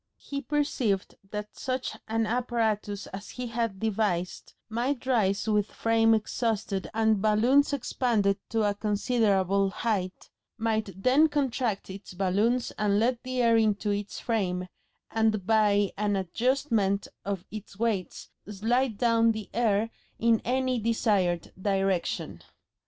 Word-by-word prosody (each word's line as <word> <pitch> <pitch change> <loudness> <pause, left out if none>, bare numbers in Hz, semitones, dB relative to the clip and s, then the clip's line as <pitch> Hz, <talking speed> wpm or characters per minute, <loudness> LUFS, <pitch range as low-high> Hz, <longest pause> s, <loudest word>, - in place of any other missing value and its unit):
He 280 0 -5
perceived 270 -10 -1 0.2
that 210 0 -6
such 255 -1 -3
an 225 0 0
apparatus 220 -4 -1
as 200 +1 -7
he 250 - -5
had 230 -4 -2
devised 205 -5 -1
might 240 +4 -2
rise 210 -5 +1
with 210 -1 +2
frame 225 0 +3
exhausted 220 -3 -2
and 220 -2 +2
balloons 235 +8 +4
expanded 230 -7 +1
to 225 -1 +1
a 205 -1 +2
considerable 200 -2 +1
height, 195 -3 -3 0.3
might 220 -2 0
then 290 +5 +5
contract 255 -7 -1
its 190 -1 -9
balloons 205 +7 +1
and 205 -1 +2
let 235 +2 +1
the 255 -1 -1
air 230 -1 +5
into 210 -1 +1
its 205 0 -3
frame, 185 -6 -1 0.5
and 220 -3 +1
by 205 -2 +3
an 205 -1 +1
adjustment 210 - 0 0.2
of 195 -3 -3
its 210 -1 -9
weights 210 -5 -2 0.2
slide 225 +3 0
down 230 -1 +3
the 215 -2 -7
air 225 -1 +1 0.3
in 230 -1 +3
any 255 0 0
desired 205 -6 0
direction. 195 -3 -1
220 Hz, 130 wpm, -28 LUFS, 200-235 Hz, 0.5 s, then